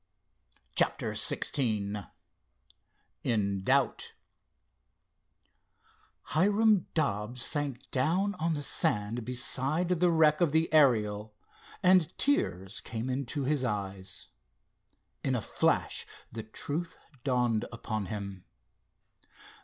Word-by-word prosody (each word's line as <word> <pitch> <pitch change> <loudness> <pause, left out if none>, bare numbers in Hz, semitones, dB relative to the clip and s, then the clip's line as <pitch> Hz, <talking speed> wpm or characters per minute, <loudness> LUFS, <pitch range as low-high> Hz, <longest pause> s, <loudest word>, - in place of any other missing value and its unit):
CHAPTER - - +2
XVI 105 - -1 1.1
IN 100 -4 0
DOUBT - - +1 2.2
Hiram 205 +4 +3
Dobbs 120 -5 -1
sank 140 -3 -3
down 175 +10 +1
on 165 0 +1
the 145 - -4
sand 110 -2 -1
beside 135 +7 0
the 180 0 +4
wreck 155 -2 +4
of 160 -4 +3
the 160 0 +2
Ariel 110 -7 +3 0.5
and 180 -3 +4
tears 95 - 0
came 120 +2 -3
into 140 +2 -2
his 140 0 +1
eyes. 100 -4 -4 0.9
In - - +1
a - - +1
flash - - 0 0.2
the 110 - -5
truth 150 +10 -4 0.3
dawned 125 -4 +1
upon 110 -3 -4
him. 100 -2 -6
125 Hz, 95 wpm, -30 LUFS, 105-155 Hz, 2.2 s, the